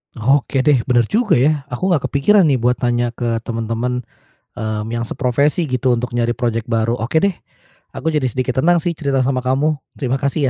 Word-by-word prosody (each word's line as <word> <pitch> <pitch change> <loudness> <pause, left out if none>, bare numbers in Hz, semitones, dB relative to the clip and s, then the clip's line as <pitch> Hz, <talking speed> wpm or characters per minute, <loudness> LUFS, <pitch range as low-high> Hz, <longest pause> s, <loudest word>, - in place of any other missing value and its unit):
Oke 135 +3 +1
deh, 145 -3 +4
bener 120 -2 +3
juga 225 0 +2
ya, 145 +2 +1
aku 160 +9 -2
nggak 155 -7 +1
kepikiran 175 +7 +3
nih 140 - +3
buat 125 0 +1
tanya 120 -1 0
ke 115 -1 -2
temen-temen, 115 +2 -2 0.6
eee, 110 -1 -2
yang 115 0 -3
seprofesi 140 +7 0
gitu 125 -3 +1
untuk 120 0 -4
nyari 120 0 0
projek 115 -2 -2
baru. 115 0 0
Oke 130 - 0
deh, 200 - +3 0.6
aku 160 - -1
jadi 150 -4 +1
sedikit 130 +1 -2
tenang 170 +3 +3
sih 175 - 0
cerita 140 -5 -1
sama 130 0 0
kamu. 140 +4 0 0.2
Terima 135 -1 -2
kasih 140 0 0
130 Hz, 190 wpm, -18 LUFS, 120-145 Hz, 0.6 s, deh